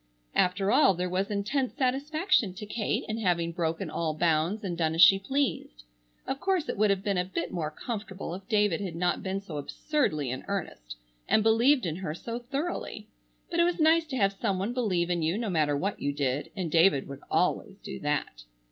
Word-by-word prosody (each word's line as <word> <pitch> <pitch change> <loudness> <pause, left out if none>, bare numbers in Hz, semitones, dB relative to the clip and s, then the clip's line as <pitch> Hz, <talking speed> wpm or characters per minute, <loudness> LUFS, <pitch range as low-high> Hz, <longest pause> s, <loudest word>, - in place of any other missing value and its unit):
After 195 +2 +2
all 255 -8 +5
there 180 +1 -2
was 190 +3 0
intense 215 +6 -1
satisfaction 275 - +1
to 210 - -7
Kate 210 +1 -1
in 220 +1 -3
having 170 -5 +1
broken 165 0 -2
all 155 -2 -1
bounds 170 +6 +1
and 180 -3 -2
done 160 -1 0
as 165 - +3
she 195 - +8
pleased. 200 - -2 0.4
Of 270 - -3
course 370 -3 0
it - - -2
would 210 +1 +3
have 195 -1 +1
been 200 -3 0
a - - +2
bit 180 -2 -4
more 165 -4 -2
comfortable 195 0 -6
if 190 +2 -8
David 205 -5 +2
had 185 -5 -4
not 175 +1 0
been 190 +1 -3
so 165 -6 -7
absurdly 150 - -1
in 130 - -5
earnest, 155 - -5 0.3
and 215 - +4
believed 235 +4 +4
in 165 -1 -2
her 170 -5 -4
so 230 +7 -5
thoroughly. 280 +8 -4 0.4
But 340 - 0
it - - +6
was 345 0 0
nice 320 +1 +4
to 265 -3 -3
have 195 -3 +2
some 195 -1 -1
one 200 +6 -2
believe 185 -8 0
in 175 -1 0
you 160 +5 0
no 225 -3 -2
matter 150 -4 +2
what 195 +7 -2
you 145 - 0
did, 140 0 -1
and 180 -5 -3
David 165 -4 +4
would 140 0 -9
always 195 +2 0
do - - -6
that. 145 - -2
195 Hz, 210 wpm, -28 LUFS, 165-230 Hz, 0.4 s, she